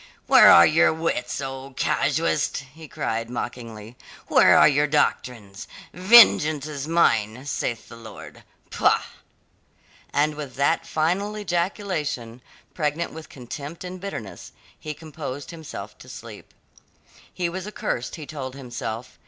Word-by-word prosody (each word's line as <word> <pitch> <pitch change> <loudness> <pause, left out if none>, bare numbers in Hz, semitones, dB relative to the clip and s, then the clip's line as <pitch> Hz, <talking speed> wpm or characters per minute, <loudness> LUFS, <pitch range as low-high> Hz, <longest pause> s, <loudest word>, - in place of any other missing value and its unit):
"Where - - +8
are 85 - +9
your 165 +3 +4
wits, 160 -7 -2
O 135 0 -7
casuist?" 160 -2 0 0.2
he 160 0 -12
cried 115 -3 -3
mockingly. 115 -2 -7 0.3
"Where - - +5
are - - +7
your 145 0 +2
doctrines? 115 -8 -1 0.3
'Vengeance 180 -7 +6
is 145 -2 -6
mine, 125 -7 +1
saith 120 -4 -3
the - - -12
Lord!' 115 -2 -12 0.3
Pah!" - - +2 1.1
And 150 +1 +1
with 145 -4 -8
that 140 +4 +1
final 185 +7 -1
ejaculation, 170 - -3 0.3
pregnant 155 +1 -2
with 160 0 -10
contempt 140 +6 -8
and 180 0 -8
bitterness, 110 - -8 0.3
he 150 -1 -6
composed 150 -2 -8
himself 160 -3 -9
to - - -14
sleep. - - -11 0.8
He 180 - -2
was 185 +3 -6
accursed 125 - -4
he 155 - -8
told 135 -4 -7
himself. 125 -2 -7
145 Hz, 130 wpm, -24 LUFS, 125-165 Hz, 1.1 s, are